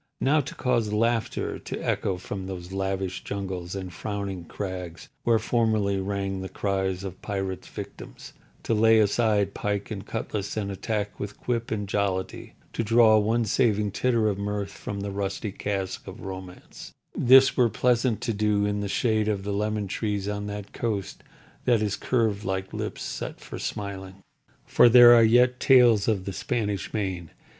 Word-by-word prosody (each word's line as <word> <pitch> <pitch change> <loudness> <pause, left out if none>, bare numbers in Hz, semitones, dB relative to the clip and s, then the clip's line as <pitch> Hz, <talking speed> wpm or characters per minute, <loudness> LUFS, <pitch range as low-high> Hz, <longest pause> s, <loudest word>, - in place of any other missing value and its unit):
Now 145 +3 +3
to 145 - -8
cause 120 -5 0
laughter 115 +1 0
to - - -6
echo 95 -2 -1
from 95 +1 -6
those 90 -1 -7
lavish 95 -1 -2
jungles 95 -3 -5
and 95 -2 -6
frowning 100 -1 -4
crags 90 -3 -6 0.2
where 115 -1 +4
formerly 110 -3 +1
rang 95 0 -2
the 95 - -6
cries 95 -1 -2
of 95 -2 -7
pirates' 95 -3 -4
victims; - - -9 0.3
to - - 0
lay 110 +1 +5
aside 105 -2 +2
pike 100 0 -3
and 100 -2 -5
cutlass 105 -2 -4
and 100 -2 -2
attack 105 +1 -3
with 100 0 -6
quip 115 -2 -2
and 105 -2 -2
jollity; 95 -2 -2 0.2
to - - -1
draw 115 -1 +5
one 115 +2 +1
saving 105 -2 +1
titter 115 +2 +1
of 100 -2 -1
mirth 100 -1 -3
from 100 0 -6
the 100 0 -4
rusty 100 +1 -3
casque 95 -1 -4
of 95 +5 -9
Romance—this 95 +7 +1
were 125 -3 +4
pleasant 120 +1 +1
to 115 - -1
do 105 0 +1
in 105 0 -1
the 100 - -2
shade 110 -1 +1
of 100 -3 -1
the 100 0 -3
lemon 105 0 -1
trees 100 0 -2
on 105 0 -3
that 105 -1 -7
coast 105 -5 -3 0.4
that 115 -3 +3
is 105 -1 0
curved 110 -5 0
like 95 0 -3
lips - - -4
set - - -5
for - - -8
smiling. 95 -2 -5 0.5
For 120 - +6
there 120 0 +9
are 115 -1 +7
yet 125 +2 +4
tales 120 -6 +5
of 100 -5 0
the 100 - -4
Spanish 105 -1 -2
Main. 95 -6 -3
105 Hz, 165 wpm, -26 LUFS, 95-110 Hz, 0.5 s, there